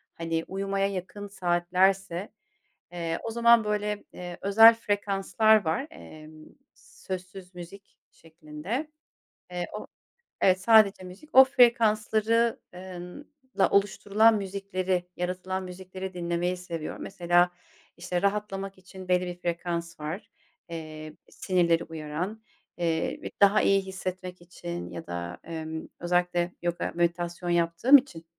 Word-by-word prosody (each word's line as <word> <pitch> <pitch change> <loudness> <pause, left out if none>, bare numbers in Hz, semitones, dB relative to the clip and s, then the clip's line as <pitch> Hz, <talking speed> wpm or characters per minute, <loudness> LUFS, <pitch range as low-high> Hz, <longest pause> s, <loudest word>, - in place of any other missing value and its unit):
hani, 165 0 -2
uyumaya 195 +1 -1
yakın 200 +2 -6
saatlerse, 185 0 0 0.6
eee, 170 -1 -3
o 225 - -4
zaman, 235 -1 +5
böyle, 210 0 -2
eee, 175 -1 -8
özel 225 +3 +8
frekanslar 205 0 +2
var, 160 - -1
emm, 155 - -13 0.3
sözsüz 185 0 -9
müzik 185 +3 -12
şeklinde, 165 - -6 0.6
eee, 175 -1 -3
o 210 - -6 0.6
Evet, 185 0 +4
sadece 210 -2 +5
müzik, 185 +12 -12
o 265 - +10
frekansları 230 -2 +3
eee, 185 +1 -9
ınla 260 +7 -3
oluşturulan 205 +2 +3
müzikleri, 190 -2 -2
yaratılan 185 +1 -3
müzikleri 185 +1 -8
dinlemeyi 175 +1 -2
seviyorum, 170 -3 -6
mesela, 175 -2 +2 0.5
işte, 180 0 -3
rahatlamak 195 -1 -2
için 185 0 -12
belli 180 0 +2
bir 175 0 -5
frekans 170 -1 -4
var, 155 +7 -6 0.4
eee, 155 -2 -8 0.2
sinirleri 170 -3 +1
uyaran, 165 +7 -5 0.4
eee, 165 -2 -1
bi - - -6
daha 200 +1 +6
iyi 195 0 +3
hissetmek 185 -1 -6
için, 175 0 -7
ya 165 - -8
da, 85 0 -5
emm, 160 -1 -6
özellikle 175 0 0
yoga, 175 0 -2
meditasyon 175 +1 -1
yaptığım 175 +10 +5
için 210 -12 -6
185 Hz, 120 wpm, -27 LUFS, 175-200 Hz, 0.6 s, o